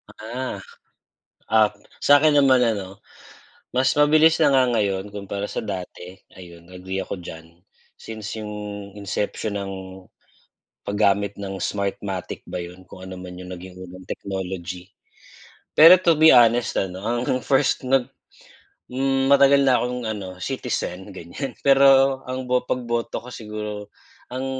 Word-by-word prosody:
Ah, 120 Hz, +4 st, -5 dB, 1.0 s
ah, 110 Hz, -1 st, +5 dB, 0.3 s
sa 145 Hz, 0 st, +7 dB
akin 155 Hz, +1 st, +3 dB
naman 135 Hz, -3 st, +5 dB
ano, 100 Hz, -4 st, -3 dB, 0.8 s
mas 130 Hz, +1 st, +2 dB
mabilis 155 Hz, +2 st, +5 dB
na 145 Hz, -3 st, +3 dB
nga 130 Hz, -2 st, +4 dB
ngayon 100 Hz, -1 st, -1 dB
kumpara 100 Hz, 0 st, -5 dB
sa -, -, -7 dB
dati, 90 Hz, -2 st, -7 dB, 0.2 s
ayun 85 Hz, -2 st, -13 dB
agree 95 Hz, +1 st, -5 dB
ako -, -, -5 dB
diyan 80 Hz, -2 st, -10 dB, 0.5 s
since 110 Hz, -1 st, -7 dB
'yung 105 Hz, -1 st, -6 dB, 0.4 s
inception 105 Hz, +1 st, -3 dB
ng 100 Hz, -1 st, -5 dB, 1.1 s
paggamit 100 Hz, 0 st, 0 dB
ng 95 Hz, -1 st, -6 dB
Smartmatic 100 Hz, -2 st, -3 dB
ba 90 Hz, -, -4 dB
'yun, 90 Hz, +1 st, -8 dB
kung 95 Hz, -, -11 dB
ano 95 Hz, -, -8 dB
man 90 Hz, -1 st, -9 dB
'yung 90 Hz, 0 st, -8 dB
naging 90 Hz, +1 st, -10 dB
unang 90 Hz, 0 st, -11 dB
technology. 95 Hz, -1 st, -5 dB, 0.8 s
Pero 165 Hz, +4 st, +9 dB
to 175 Hz, -2 st, +3 dB
be 160 Hz, +1 st, +6 dB
honest 120 Hz, -2 st, +5 dB
ano, 95 Hz, 0 st, -2 dB
ang 120 Hz, +3 st, -1 dB
first 135 Hz, 0 st, +1 dB
nag 135 Hz, -2 st, +3 dB, 0.8 s
hmm, 135 Hz, +1 st, 0 dB
matagal 140 Hz, 0 st, +5 dB
na 125 Hz, -3 st, +3 dB
akong 125 Hz, -1 st, -3 dB
ano, 100 Hz, -4 st, -5 dB
citizen 95 Hz, +1 st, -4 dB
ganiyan 95 Hz, -, -7 dB
pero 135 Hz, -1 st, +5 dB
ang 130 Hz, 0 st, -4 dB
bo 125 Hz, 0 st, +1 dB
pagboto 120 Hz, -2 st, -2 dB
ko -, -, -9 dB
siguro, 105 Hz, -1 st, -7 dB, 0.4 s
ang 130 Hz, +1 st, -4 dB
105 Hz, 135 wpm, -23 LUFS, 95-130 Hz, 1.1 s, Pero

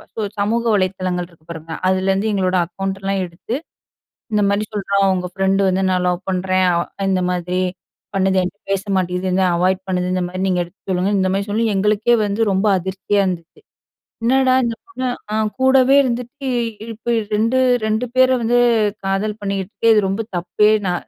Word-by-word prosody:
So -, -, -5 dB, 0.2 s
சமூக 225 Hz, +3 st, +1 dB
வலைதளங்கள் 185 Hz, -2 st, -1 dB
இருக்கு 165 Hz, -2 st, -25 dB
பாருங்க, 160 Hz, 0 st, -9 dB, 0.2 s
அதுலருந்து 190 Hz, +3 st, +1 dB
எங்களோட 185 Hz, -1 st, +1 dB
அக்கவுண்ட்டல்லாம் 195 Hz, +1 st, -3 dB
எடுத்து, 175 Hz, +7 st, -6 dB, 0.8 s
இந்த 210 Hz, -1 st, +2 dB
மாரி 200 Hz, +1 st, +1 dB
சொல்றான், 200 Hz, -1 st, +1 dB
"உங்க 180 Hz, -1 st, -2 dB
ஃபிரண்டு 195 Hz, +1 st, +1 dB
வந்து 190 Hz, +1 st, +1 dB
நான் 180 Hz, -1 st, +1 dB
லவ் 180 Hz, 0 st, -1 dB
பண்றேன். 185 Hz, 0 st, +1 dB
அவ் 170 Hz, -, +1 dB, 0.3 s
இந்த 185 Hz, -1 st, +1 dB
மாதிரி 180 Hz, +1 st, -1 dB, 0.5 s
பண்ணுது, 190 Hz, 0 st, +2 dB
என்கிட்ட 185 Hz, +3 st, -5 dB
பேச 195 Hz, +1 st, -1 dB
மாட்டீங்குது, 180 Hz, 0 st, -1 dB
என்ன 190 Hz, -, +2 dB
அவாய்ட் 185 Hz, +2 st, +1 dB
பண்ணுது, 180 Hz, -1 st, -1 dB
இந்த 185 Hz, -1 st, 0 dB
மாரி 185 Hz, +1 st, -4 dB
நீங்க 180 Hz, -1 st, +1 dB
எடுத்து 175 Hz, +3 st, -20 dB
சொல்லுங்க." 185 Hz, +2 st, +1 dB
இந்த 185 Hz, 0 st, +1 dB
மாரி 200 Hz, +1 st, -1 dB
சொல்லி, 220 Hz, +3 st, +1 dB
எங்களுக்கே 210 Hz, +4 st, +2 dB
வந்து 205 Hz, +2 st, -1 dB
ரொம்ப 190 Hz, +3 st, +1 dB
அதிர்ச்சியா 190 Hz, +2 st, -1 dB
இருந்துச்சு. 175 Hz, -, -5 dB, 0.6 s
"என்னடா 260 Hz, +2 st, +3 dB
இந்தப் 230 Hz, -1 st, -4 dB
பொண்ணு 260 Hz, -9 st, -4 dB, 0.3 s
அ -, -, 0 dB, 0.2 s
கூடவே 265 Hz, 0 st, +5 dB
இருந்துட்டு, 255 Hz, +2 st, -3 dB, 0.4 s
இப்படி 235 Hz, +2 st, -1 dB, 0.2 s
2 225 Hz, +4 st, +1 dB, 0.3 s
2 220 Hz, +3 st, 0 dB
பேர 260 Hz, 0 st, +6 dB
வந்து 245 Hz, +2 st, +3 dB, 0.5 s
காதல் 205 Hz, +2 st, -1 dB
பண்ணீட்டுருக்கு, 200 Hz, +3 st, -2 dB
இது 210 Hz, -2 st, +3 dB
ரொம்ப 200 Hz, +4 st, -1 dB, 0.2 s
தப்பே 210 Hz, +4 st, +2 dB, 0.2 s
நா 180 Hz, -, +1 dB
195 Hz, 165 wpm, -19 LUFS, 185-215 Hz, 0.8 s, பேர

